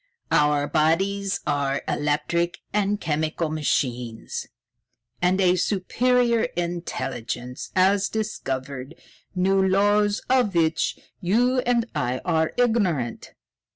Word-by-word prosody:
Our 150 -1 +3
bodies 195 +6 +1
are 140 -1 0
electric 170 +4 0 0.2
and 205 0 +1
chemical 155 0 -1
machines; 125 -6 -2 0.7
and 180 +2 +2
a 180 -1 +4
super 240 +7 +1 0.3
intelligence 135 -8 -4
has 195 +2 +3
discovered 140 -9 -4 0.4
new 190 +1 +3
laws 205 +2 +2
of 250 -7 +2
which 160 -1 +1 0.2
you 240 +8 +2
and 240 -2 +2
I 130 -4 -1
are 160 -2 +1
ignorant." 190 - 0
175 Hz, 95 wpm, -24 LUFS, 145-200 Hz, 0.7 s, a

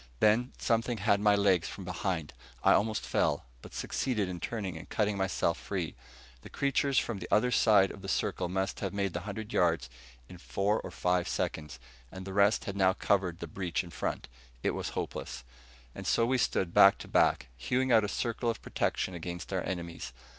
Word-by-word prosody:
Then 110 +4 +3
something 115 0 0
had 100 0 +2
my 105 0 +4
legs 95 -4 +3
from 95 - -8
behind. 90 -4 -3 0.3
I - - +6
almost 110 +1 +1
fell, - - +1 0.2
but - - -12
succeeded 110 -8 -1
in 90 -1 -5
turning 100 -3 -4
and 80 +3 -9
cutting 105 -1 +1
myself 95 -3 0
free. 90 -5 -3 0.5
The - - -11
creatures 140 -1 +1
from 115 -4 +1
the 90 - -6
other 125 +4 +3
side 100 -5 +5
of 100 - -10
the 95 - -7
circle 95 -2 -1
must 95 +1 -2
have - - -3
made 100 -3 -1
the 85 - -2
hundred 110 +3 -6
yards 80 -7 +2 0.4
in 90 - -12
four 100 +4 0
or - - -7
five 90 -1 0
seconds. 75 -3 -3 0.3
And 95 0 -8
the 95 - -6
rest 100 +3 +3
had 100 -3 -4
now 95 -1 +4
covered 90 -3 0
the - - -3
breach 85 +1 -2
in 85 - -11
front. - - -3 0.4
It - - +2
was - - -3
hopeless. - - -4 0.5
And - - -7
so 115 - +3
we 130 +2 +1
stood 90 -6 0
back 100 0 +7
to - - -9
back, 60 - +2
hewing 125 - 0
out 110 -2 +6
a - - 0
circle 115 +3 -1
of 115 - -2
protection 95 - -1
against 85 +2 -6
our 95 - 0
enemies. 85 -6 -5
95 Hz, 195 wpm, -30 LUFS, 90-110 Hz, 0.5 s, back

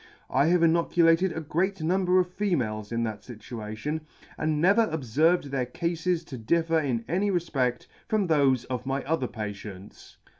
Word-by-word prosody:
I 140 +3 +3
have 175 0 +3
inoculated 170 +1 +3
a 160 - -4
great 185 +5 -1
number 180 +2 +2
of 180 0 -1
females 120 - -1
in 115 0 0
that 110 -2 -4
fituation, 115 +5 -6 0.3
and 155 -1 -1
never 200 +7 +4
obferved 160 +4 +2
their 130 -3 -1
cafes 170 +4 -1
to 130 -6 -8
differ 165 +7 +1
in 125 -6 -2
any 190 +8 +1
refpedt 135 -9 -1 0.2
from 210 -3 +1
thofe 140 -6 +3
of 125 0 -4
my 135 0 -1
other 150 -4 -1
patients. 105 -3 -8
155 Hz, 155 wpm, -27 LUFS, 120-175 Hz, 0.3 s, never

